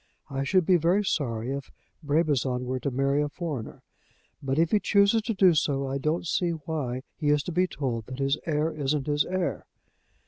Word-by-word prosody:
I 135 0 -1
should 185 +4 +2
be 180 +1 +5
very 175 +5 +2
sorry 120 -8 -1
if 140 -1 -5 0.3
Brabazon 145 -5 +1
were 130 +1 -2
to 140 - -2
marry 135 +2 +1
a 150 - -1
foreigner. 145 -8 -6 0.6
But 135 0 -1
if 165 +1 +2
he 210 - +4
chooses 200 +2 +3
to 225 0 -3
do 190 -2 +6
so 140 -3 +1
I 135 +1 -2
don't 155 +5 -1
see 175 +1 0
why 150 -6 -3
he 155 - -2
is 150 0 +3
to 180 - -4
be 180 +2 +2
told 125 -9 -3
that 130 - -7
his 135 0 +1
heir 155 0 +1
isn't 145 -2 -1
his 145 0 +1
heir. 185 -1 -2
150 Hz, 200 wpm, -27 LUFS, 135-170 Hz, 0.6 s, do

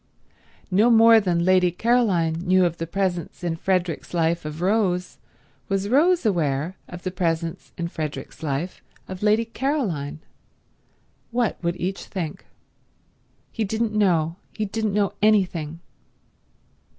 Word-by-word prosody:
No 210 +6 +4
more 225 -1 +7
than 175 -4 0
Lady 185 -1 +4
Caroline 190 -5 +2
knew 185 0 +3
of 170 -1 -1
the 165 - -4
presence 185 -1 -2
in 170 -2 -1
Frederick's 180 -1 -1
life 165 -1 +1
of 155 +1 -6
Rose 185 -1 0 0.5
was 195 0 -1
Rose 330 +5 +3
aware 165 -3 0
of 175 0 -9
the 185 - -2
presence 165 -2 -2
in 170 - -2
Frederick's 155 -3 -6
life 155 +4 -3 0.3
of 185 -1 -7
Lady 215 +2 +3
Caroline. 225 - -2 1.1
What 235 -2 -1
would 170 +1 -1
each 190 +2 -3
think? 165 -6 -5 1.0
He 225 - -2
didn't 220 +2 -1
know; 175 -6 +2 0.2
he 215 - -2
didn't 210 0 -2
know 205 -2 +1
anything. 180 -7 +1
185 Hz, 130 wpm, -24 LUFS, 170-215 Hz, 1.1 s, more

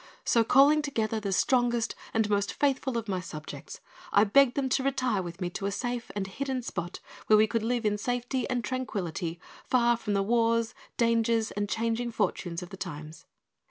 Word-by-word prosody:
So, 230 - +4
calling 280 +6 +5
together 225 -7 -1
the 200 -2 -3
strongest 240 +1 +2 0.2
and 220 -1 +1
most 205 -1 0
faithful 270 -3 0
of 225 -1 -4
my 190 -2 -1
subjects, 155 -4 -8 0.3
I 200 - +6
begged 245 +4 +4
them 275 -2 0
to 270 - +2
retire 255 -6 0
with 175 0 -7
me 180 -2 -2
to 195 - -3
a - - -1
safe 245 +2 -3
and 200 -2 -1
hidden 260 +5 -3
spot 175 -6 -5 0.3
where 215 - +7
we 215 - +6
could 230 +1 -1
live 235 +1 -1
in 210 0 +1
safety 245 +2 -2
and 245 -2 -1
tranquillity 185 -9 -3 0.2
far 240 -1 +3
from 225 -3 -3
the 200 0 +2
wars, 230 +1 +2 0.2
dangers, 230 -1 +2
and 205 0 -2
changing 230 +2 -1
fortunes 185 -5 -2
of 175 - -9
the 190 - -8
times. 155 -3 -8
225 Hz, 190 wpm, -28 LUFS, 200-245 Hz, 0.3 s, where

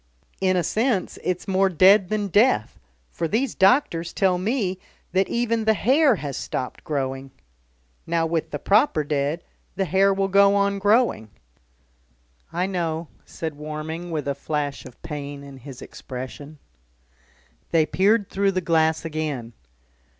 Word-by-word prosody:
In 185 -1 +2
a 175 - +1
sense 220 - 0
it's 180 -1 -2
more 190 0 +3
dead 185 +2 +5
than 215 -1 -1
death, 205 - +2 0.3
for 165 - -2
these 240 - 0
doctors 190 - +2
tell 185 -2 +2
me 195 -2 -1 0.3
that 190 +2 +1
even 230 -2 0
the 220 0 +4
hair 270 +4 +4
has 145 -7 -5
stopped 125 - -5
growing. 135 -2 -3 0.8
Now 165 0 +1
with 165 -1 -1
the 145 - -4
proper 200 - +3
dead, 145 +3 -1 0.3
the 195 +1 0
hair 190 +3 +3
will 195 0 0
go 200 +1 +5
on 200 0 +1
growing 205 - +2 0.6
" - - -39
"I 175 +2 0
know," 170 -4 -3 0.2
said 160 -2 -5
Warming, 155 +3 -6
with 155 -3 -3
a 140 - +1
flash 145 0 -3
of 125 - -16
pain 145 -2 -6
in 140 -1 -11
his 130 0 -10
expression. 130 +4 -8 1.1
They 160 -2 +3
peered 200 +4 +2
through 195 0 0
the 185 - +1
glass 160 -2 +1
again. 150 -7 -4
170 Hz, 150 wpm, -23 LUFS, 145-200 Hz, 1.1 s, dead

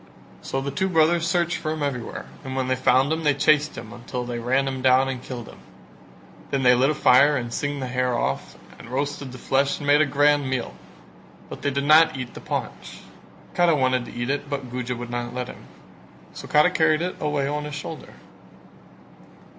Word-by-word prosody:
So 135 - -3
the 140 +1 -3
two 190 +7 -1
brothers 165 0 +3
searched 170 0 +1
for 155 - -4
him 155 -1 -2
everywhere 125 -5 -4 0.2
and 130 0 -6
when 130 -1 -1
they 130 - +2
found 130 +3 +3
him 160 0 -3
they 145 -2 +3
chased 150 +1 +2
him 115 0 -8
until 120 +1 -6
they 120 -1 -4
ran 130 +3 +1
him 130 -1 -3
down 130 +1 +4
and 130 -2 -4
killed 125 -3 -7
him; - - -13 0.9
then 135 -1 -1
they 125 0 +6
lit 130 +3 +3
a 155 - 0
fire 140 +2 +5
and 120 -1 -4
singed 145 -1 -3
the - - -3
hair 125 -1 0
off 70 - -3 0.2
and - - -12
roasted 140 +1 -3
the 130 - -9
flesh 135 +2 0
and 145 - -7
made 145 +1 +5
a 155 - +3
grand 145 0 +2
meal: 130 -2 -2 0.8
but - - -8
they 145 - 0
did 140 0 -2
not 155 0 +6
eat 125 -2 -6
the - - -10
paunch. - - -5 0.5
Kara 175 -2 +3
wanted 130 -3 +1
to - - -10
eat 120 +2 -2
it 145 0 -3
but 135 -4 -4
Guja 125 0 -3
would 120 0 -7
not 120 0 -4
let 125 0 -3
him, - - -12 0.7
so - - -9
Kara 150 +4 +4
carried 160 -2 +2
it 180 - -3
away 150 -2 0
on 150 +1 -3
his 150 -1 -6
shoulder. 150 +1 -8
135 Hz, 210 wpm, -24 LUFS, 125-150 Hz, 0.9 s, they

